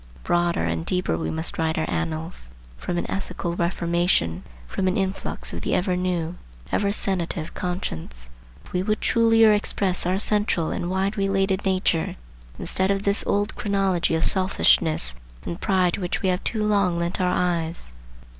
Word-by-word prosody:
Broader 175 Hz, -, +1 dB
and 80 Hz, 0 st, -1 dB
deeper 180 Hz, -, 0 dB
we 80 Hz, -1 st, -2 dB
must 80 Hz, -, -3 dB
write 160 Hz, -1 st, 0 dB
our 160 Hz, -, 0 dB
annals,—from 155 Hz, -, -4 dB
an -, -, -1 dB
ethical 180 Hz, -3 st, -3 dB
reformation, 170 Hz, -, +1 dB, 0.3 s
from 190 Hz, -, -1 dB
an 185 Hz, -, +1 dB
influx 190 Hz, -, -3 dB
of 85 Hz, -, -4 dB
the -, -, 0 dB
ever 180 Hz, 0 st, +1 dB
new, 180 Hz, -2 st, -1 dB, 0.3 s
ever 200 Hz, -1 st, +1 dB
sanative 175 Hz, -5 st, -1 dB
conscience,—if 65 Hz, -, -6 dB
we 180 Hz, -, +1 dB
would 215 Hz, +2 st, 0 dB
trulier 225 Hz, -2 st, +5 dB
express 190 Hz, -3 st, -1 dB
our 185 Hz, +1 st, +2 dB
central 205 Hz, -5 st, +1 dB
and 175 Hz, -, -2 dB
wide 190 Hz, +3 st, 0 dB
related 195 Hz, 0 st, +1 dB
nature, 185 Hz, -1 st, +1 dB, 0.4 s
instead 190 Hz, +1 st, 0 dB
of 200 Hz, 0 st, +1 dB
this 200 Hz, 0 st, +2 dB
old 205 Hz, +1 st, 0 dB
chronology 195 Hz, -5 st, +1 dB
of 160 Hz, -, +1 dB
selfishness 170 Hz, -, +4 dB, 0.3 s
and 170 Hz, -, -5 dB
pride 185 Hz, -4 st, +2 dB
to -, -, -3 dB
which 180 Hz, +2 st, -2 dB
we 190 Hz, -, +3 dB
have 180 Hz, 0 st, 0 dB
too 220 Hz, -2 st, -1 dB
long 200 Hz, -4 st, +2 dB
lent 170 Hz, +2 st, -1 dB
our 180 Hz, -, +2 dB
eyes. 170 Hz, -, -1 dB
180 Hz, 160 wpm, -24 LUFS, 160-195 Hz, 0.4 s, trulier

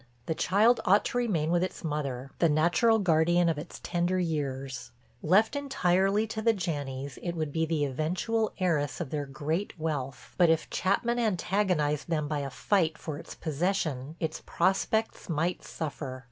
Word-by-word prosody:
The 160 Hz, -, 0 dB
child 215 Hz, +8 st, +3 dB
ought 200 Hz, +3 st, +4 dB
to -, -, -2 dB
remain 170 Hz, -10 st, 0 dB
with 175 Hz, 0 st, +3 dB
its 185 Hz, -, -4 dB
mother, 140 Hz, -4 st, -3 dB
the 170 Hz, -, +4 dB
natural 175 Hz, +10 st, +4 dB
guardian 175 Hz, -2 st, +3 dB
of 160 Hz, -3 st, -1 dB
its 165 Hz, -, -9 dB
tender 175 Hz, +1 st, 0 dB
years; 135 Hz, -7 st, -3 dB, 0.3 s
left 210 Hz, -, +3 dB
entirely 205 Hz, -7 st, +2 dB
to 220 Hz, 0 st, -4 dB
the 225 Hz, 0 st, +3 dB
Janneys 140 Hz, -7 st, -4 dB
it 175 Hz, -1 st, -3 dB
would 155 Hz, -3 st, -2 dB
be 160 Hz, +2 st, 0 dB
the 155 Hz, -2 st, +1 dB
eventual 180 Hz, -, -1 dB
heiress 165 Hz, -6 st, 0 dB
of 165 Hz, -7 st, -4 dB
their 145 Hz, -2 st, -2 dB
great 155 Hz, +9 st, -3 dB
wealth, 145 Hz, -5 st, -4 dB
but 175 Hz, -2 st, +6 dB
if 160 Hz, 0 st, +1 dB
Chapman 235 Hz, +6 st, +1 dB
antagonized 180 Hz, -, 0 dB
them 155 Hz, -3 st, 0 dB
by 150 Hz, -1 st, -1 dB
a 140 Hz, -1 st, -3 dB
fight 160 Hz, +2 st, +1 dB
for 155 Hz, -2 st, -6 dB
its -, -, -10 dB
possession 155 Hz, -3 st, -2 dB
its 160 Hz, -1 st, -3 dB
prospects 195 Hz, +5 st, 0 dB
might 165 Hz, +2 st, -1 dB
suffer. 140 Hz, -4 st, -5 dB
165 Hz, 165 wpm, -29 LUFS, 150-190 Hz, 0.3 s, but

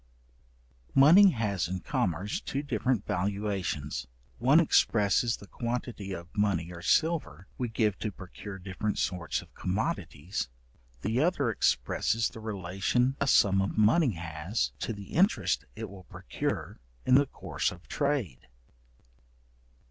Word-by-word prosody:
Money 170 Hz, +9 st, +8 dB
has 105 Hz, -, -1 dB
in 95 Hz, +1 st, -3 dB
commerce 90 Hz, +2 st, -1 dB
two 140 Hz, +1 st, -3 dB
different 130 Hz, -6 st, 0 dB
valuations. 95 Hz, -, -2 dB, 0.3 s
One 135 Hz, +7 st, +6 dB
expresses 115 Hz, -, +3 dB
the -, -, -12 dB
quantity 115 Hz, -3 st, -4 dB
of 85 Hz, -2 st, -8 dB
money 95 Hz, -5 st, +1 dB
or 85 Hz, -, -9 dB
silver 95 Hz, -, +1 dB
we 125 Hz, -2 st, -1 dB
give 110 Hz, -3 st, 0 dB
to 110 Hz, -, -2 dB
procure 95 Hz, +1 st, -9 dB
different 95 Hz, +3 st, -3 dB
sorts 90 Hz, -3 st, -1 dB
of -, -, -22 dB
commodities; 90 Hz, -, -3 dB, 0.5 s
the 110 Hz, +4 st, 0 dB
other 150 Hz, -7 st, +2 dB
expresses 110 Hz, -, +1 dB
the -, -, -11 dB
relation 110 Hz, +5 st, 0 dB
a 140 Hz, -, +2 dB
sum 95 Hz, -6 st, +5 dB
of 95 Hz, -, -2 dB
money 115 Hz, +5 st, +4 dB
has, 85 Hz, +4 st, -2 dB
to -, -, -2 dB
the 100 Hz, -3 st, -8 dB
interest 195 Hz, +6 st, +2 dB
it 110 Hz, 0 st, -5 dB
will 95 Hz, -2 st, -12 dB
procure -, -, -4 dB, 0.3 s
in 125 Hz, -, +3 dB
the 140 Hz, +2 st, +6 dB
course -, -, -2 dB
of 90 Hz, 0 st, -13 dB
trade. 140 Hz, -, -1 dB
105 Hz, 135 wpm, -29 LUFS, 90-125 Hz, 0.5 s, Money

